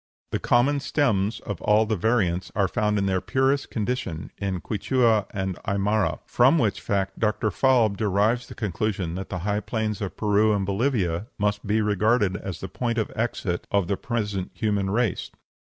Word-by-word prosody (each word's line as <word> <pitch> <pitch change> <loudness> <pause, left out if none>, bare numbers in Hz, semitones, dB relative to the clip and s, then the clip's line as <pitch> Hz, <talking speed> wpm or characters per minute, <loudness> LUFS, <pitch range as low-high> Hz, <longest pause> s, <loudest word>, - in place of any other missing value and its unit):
The - - 0
common 135 +4 +3
stems 115 -8 0
of 105 -5 -6
all 105 +1 +4
the 110 0 0
variants 95 -3 0
are 100 -2 +2
found 105 +2 0
in 100 - +1
their 95 -1 +1
purest 135 +1 +1
condition 110 - -3
in 95 -2 -2
Quichua 110 +1 +1
and 95 -3 -3
Aimara, 100 +1 0
from 130 +7 +4
which 105 -8 0
fact 95 -1 -2
Dr. 110 -1 +1
Falb 115 -3 +3
derives 105 +4 +1
the - - -10
conclusion 100 -4 -2
that 95 +2 -5
the 90 - -3
high 105 0 +1
plains 110 0 -3
of 100 - -4
Peru 105 0 +3
and 100 -1 -1
Bolivia 100 -4 0
must 105 0 -1
be 110 +2 +2
regarded 105 -1 +2
as 95 -2 -6
the 95 - -4
point 120 +1 -2
of 110 - -1
exit 105 -6 -2
of 100 -3 +1
the 100 - 0
present 105 -5 -3
human 100 -3 0
race. 115 0 0
105 Hz, 175 wpm, -25 LUFS, 95-115 Hz, -, all